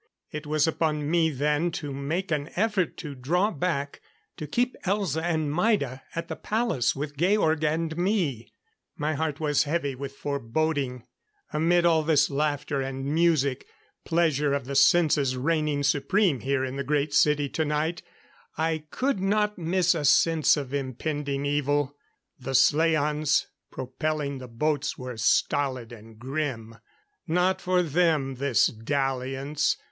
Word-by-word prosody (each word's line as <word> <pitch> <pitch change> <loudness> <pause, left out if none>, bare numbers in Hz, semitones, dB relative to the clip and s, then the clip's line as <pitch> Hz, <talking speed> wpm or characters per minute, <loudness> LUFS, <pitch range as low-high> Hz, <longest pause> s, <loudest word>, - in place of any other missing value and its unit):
It 150 -1 -6
was 155 +1 +2
upon 155 -2 -1
me 165 -2 +3
then 150 +3 0
to 145 -4 -4
make 160 +7 -3
an 150 0 -1
effort 200 -3 0
to 150 -4 -6
draw 175 +11 0
back, 145 -4 -2 0.4
to 150 - -6
keep 245 - 0
Elza 190 -5 0
and 160 -3 -1
Maida 165 - +1
at 165 - -3
the - - -4
palace 220 - 0
with 145 +1 -5
Georg 160 -2 +2
and 160 +1 0
me. 175 - -1 0.5
My 150 +1 -1
heart 155 -1 -2
was 150 -2 +2
heavy 145 -2 -1
with 135 +1 -7
foreboding. 140 -1 -2 0.5
Amid 170 +3 +3
all 165 -2 +4
this 150 -2 +2
laughter 145 -1 -1
and 135 0 -4
music 155 -5 +1 0.4
pleasure 155 -4 +1
of 140 -3 -3
the 140 - -5
senses 145 -3 +4
reigning 150 0 0
supreme 145 - +2
here 130 +1 0
in 130 +1 -5
the 140 - -2
Great 145 +1 0
City 150 -1 +3
tonight 155 +3 -1 0.6
I 160 -1 -1
could 265 - -1
not 210 +1 0
miss 180 +1 +2
a 160 -3 -3
sense 155 +2 +4
of 140 -2 -5
impending 140 +1 -3
evil. 145 0 0 0.4
The 135 +1 -4
slaans 150 0 +3 0.3
propelling 140 +2 -3
the 130 - -8
boats 145 +5 -1
were 125 -2 -7
stolid 125 +2 +1
and 110 -1 -13
grim. 125 -3 -4 0.5
Not 180 +3 +1
for 180 0 +2
them, 155 -4 +1
this 130 -5 +3
dalliance. 135 +4 -1
150 Hz, 140 wpm, -26 LUFS, 140-165 Hz, 0.6 s, all